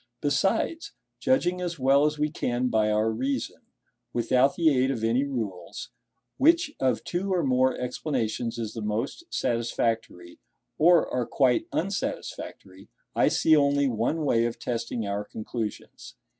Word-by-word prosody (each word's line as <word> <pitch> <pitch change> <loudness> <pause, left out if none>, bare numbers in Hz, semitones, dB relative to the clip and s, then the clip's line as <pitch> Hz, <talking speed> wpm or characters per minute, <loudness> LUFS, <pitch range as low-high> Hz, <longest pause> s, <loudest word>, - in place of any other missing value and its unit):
Besides, 225 - 0 0.3
judging 180 -9 +1
as 175 -2 -3
well 135 +2 +4
as 150 0 -2
we 150 0 0
can 125 -3 -1
by 110 -2 +2
our 110 +1 +2
reason, 130 +2 -3 0.5
without 125 +3 +2
the 160 -4 +3
aid 130 +1 +2
of 120 -5 -2
any 120 +5 +2
rules, 105 -11 -5 0.5
which 325 +2 +4
of 130 -1 +1
two 190 +3 -2
or 180 -2 +1
more 130 0 +2
explanations 120 -2 -2
is 115 -2 -4
the 115 - -5
most 105 - -3
satisfactory, 115 -6 -2 0.4
or 170 +1 +5
are 125 -2 -2
quite 130 -4 +2
unsatisfactory, 100 - -4 0.3
I - - +4
see 160 - +4
only 140 -1 +3
one 130 +7 -1
way 115 -4 +3
of 115 - -6
testing 115 -1 -3
our 100 +1 -2
conclusions. 110 +1 -6
125 Hz, 145 wpm, -26 LUFS, 115-150 Hz, 0.5 s, or